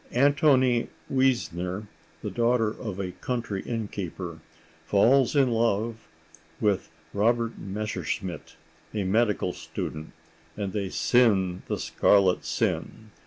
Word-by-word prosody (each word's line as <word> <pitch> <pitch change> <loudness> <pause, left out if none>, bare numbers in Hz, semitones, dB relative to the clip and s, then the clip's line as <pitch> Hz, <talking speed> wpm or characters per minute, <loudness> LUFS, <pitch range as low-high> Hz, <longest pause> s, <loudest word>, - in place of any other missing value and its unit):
Antonie 130 -3 +4 0.3
Wiesner, 105 -8 0 0.4
the - - -3
daughter 120 -1 +2
of 105 -4 -6
a 95 -2 -3
country 110 0 -3
innkeeper, 95 -7 -5 0.4
falls 125 +7 +4
in 135 -3 +4
love 115 0 0 0.5
with 105 -3 +1 0.2
Robert 115 +3 +1
Messerschmidt, 100 -4 -4 0.4
a 105 - 0
medical 105 -2 +1
student, 75 +1 -6 0.5
and 100 -3 -3
they 100 -3 -2
sin 95 -7 +3
the - - -1
scarlet 95 -3 +3
sin. 110 -1 -2
110 Hz, 105 wpm, -27 LUFS, 95-120 Hz, 0.5 s, Antonie